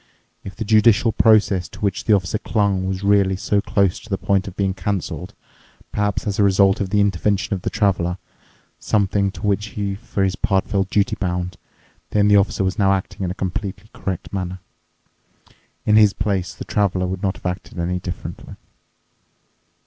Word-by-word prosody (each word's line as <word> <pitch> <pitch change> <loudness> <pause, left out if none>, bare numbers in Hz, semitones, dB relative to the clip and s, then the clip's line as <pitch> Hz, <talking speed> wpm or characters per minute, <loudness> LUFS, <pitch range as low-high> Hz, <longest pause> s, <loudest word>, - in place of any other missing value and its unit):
If 95 - -8
the 110 - -4
judicial 110 +2 +4
process 105 -5 +3
to - - -13
which 100 -1 -1
the 110 - +4
officer 100 +1 +1
clung 100 -4 0
was 95 +1 -3
really 100 -1 +3
so 100 +2 0
close 100 -3 +1
to 110 - -15
the 95 - 0
point 100 +1 0
of 95 - -8
being 95 -1 0
cancelled—perhaps 105 +1 -4
as 100 -1 -2
a - - +5
result 95 0 +4
of 95 - -2
the 105 +2 +2
intervention 100 0 +1
of 95 - -2
the - - -2
Traveler, 90 -4 0 0.6
something 100 -1 +1
to 100 - -7
which 105 0 +1
he 100 -1 -1
for 100 -1 -3
his 95 -1 +1
part 95 0 0
felt 95 -1 0
duty 100 0 +1
bound—then 90 +2 -3
the 105 - +5
Officer 100 -1 +2
was 95 +3 -1
now 95 -1 +4
acting 95 0 -3
in 90 - -1
a 90 - -4
completely 95 +2 -4
correct 95 0 -5
manner. 95 -1 -3 1.3
In 105 0 +5
his 105 -2 +6
place, 100 -3 -2
the - - -8
Traveler 95 -3 0
would 95 +1 -4
not 95 -2 0
have - - -16
acted 90 +1 -4
any 90 +1 -1
differently. 85 -1 -7
100 Hz, 180 wpm, -21 LUFS, 95-105 Hz, 1.3 s, his